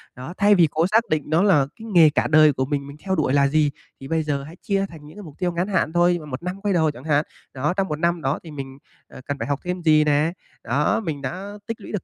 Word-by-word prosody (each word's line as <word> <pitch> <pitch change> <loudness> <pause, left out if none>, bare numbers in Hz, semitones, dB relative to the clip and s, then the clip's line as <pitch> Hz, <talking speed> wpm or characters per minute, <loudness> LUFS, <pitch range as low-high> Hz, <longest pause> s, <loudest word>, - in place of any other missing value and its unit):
Đó, 130 +7 -8
thay 205 +1 +5
vì 170 -4 +5
cố 165 +3 +1
xác 225 +3 +2
định 155 -2 0
nó 160 +4 +3
là 175 -9 +4
cái 225 - -11
nghề 165 -3 +7
cả 150 - 0
đời 155 -1 +5
của 130 0 -1
mình 140 0 -3
mình 140 +1 -11
theo 190 -1 0
đuổi 150 -6 0
là 140 -1 +4
gì, 150 0 +2 0.3
thì 135 - -9
bây 160 +1 0
giờ 140 -2 -2
hãy 155 +4 -11
chia 195 -1 0
thành 155 -3 -13
những 155 +6 -14
cái 210 - -9
mục 150 -4 -12
tiêu 180 -1 0
ngắn 175 +2 -2
hạn 185 -5 0
thôi, 175 0 +3
1 135 +2 -6
năm 180 +2 -5
quay 205 -2 0
đầu 160 -3 +2
chẳng 125 -2 -13
hạn. 150 -1 +1 0.3
Đó, 145 +6 -1
trong 195 -1 +1
1 150 0 -4
năm 170 0 0
đó 135 +1 -1
thì 165 - -10
mình, 135 -2 -8 0.3
à, - - -12
cần 140 -1 -3
phải - - -3
học 145 -1 -1
thêm 180 0 -3
gì 155 -1 +5
nè, 150 +2 +2 0.3
đó, 145 - +1
mình 155 -6 -4
đã 185 +6 -5 0.2
tích 230 -1 -5
lũy - - -9
được 210 - -3
155 Hz, 290 wpm, -22 LUFS, 145-180 Hz, 0.3 s, nghề